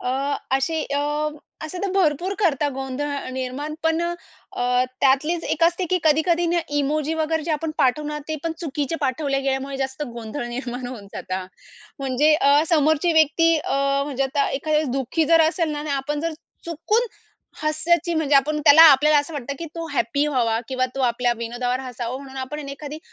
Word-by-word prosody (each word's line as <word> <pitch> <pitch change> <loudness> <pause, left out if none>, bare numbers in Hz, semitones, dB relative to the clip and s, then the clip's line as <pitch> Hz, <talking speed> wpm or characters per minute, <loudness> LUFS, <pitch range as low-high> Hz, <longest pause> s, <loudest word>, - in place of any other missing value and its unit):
अ, 250 - -2 0.5
असे 315 +4 -1
अ, - - +1 0.6
असे 315 +4 -6
तर 395 - -1
भरपूर 360 +1 +1
करतात 300 -7 +1
गोंधळ 270 +2 -4
निर्माण 260 +4 -4
पण 325 +1 +1
अ, 345 0 -1 0.5
अ, 250 0 +2 0.2
त्यातलीच 300 +5 +2
एक 330 - +1
असते, 345 +2 +2
की 370 - +3
कधी-कधी 330 +3 +3
ना 350 - +2 0.2
इमोजी 300 +2 0
वगैरे 320 0 0
जे 335 - -3
आपण 310 +1 -2
पाठवणार 300 +3 +1
ते 310 - -2
पण 330 - -1
चुकीचे 300 0 -2
पाठवले 275 0 0
गेल्यामुळे 270 0 -2
जास्त 270 +2 -3
गोंधळ 235 +3 -5
निर्माण 245 0 -5
होऊन 235 -5 -8
जातात. 185 0 -4 0.5
म्हणजे 275 +3 +3
अ, 285 0 +4
समोरची 315 +1 +3
व्यक्ती 320 +1 +4
अ, - - -4 0.3
म्हणजे 275 -2 -2
आता 280 +1 0
एखाद्या 305 +2 0
दुःखी 270 +5 0
जर 330 - +7
असेल 335 -2 -1
ना 295 - -4
आणि 300 0 -5
आपण 280 +2 -2
जर 330 +1 -2 0.3
चुकून 415 +9 0 0.6
हस्याची 335 +3 +1
म्हणजे 305 -3 +1
आपण 300 +2 +2
त्याला 310 +3 +9
आपल्याला 295 +2 +4
असं 290 +3 -3
वाटतं, 280 -1 -4
की 335 - -5
तो 330 -1 -5
हॅपी 280 +6 +1
व्हावा 235 -6 +1
किंवा 255 -1 0
तो 270 - -3
आपल्या 245 0 +1
विनोदावर 240 +2 -2
हसावं 250 -1 -5
म्हणून 270 -1 -11
आपण 260 +3 -5
आहे 295 - -7
ना 275 - -5
एखादी 295 +2 -7
290 Hz, 180 wpm, -22 LUFS, 265-315 Hz, 0.6 s, त्याला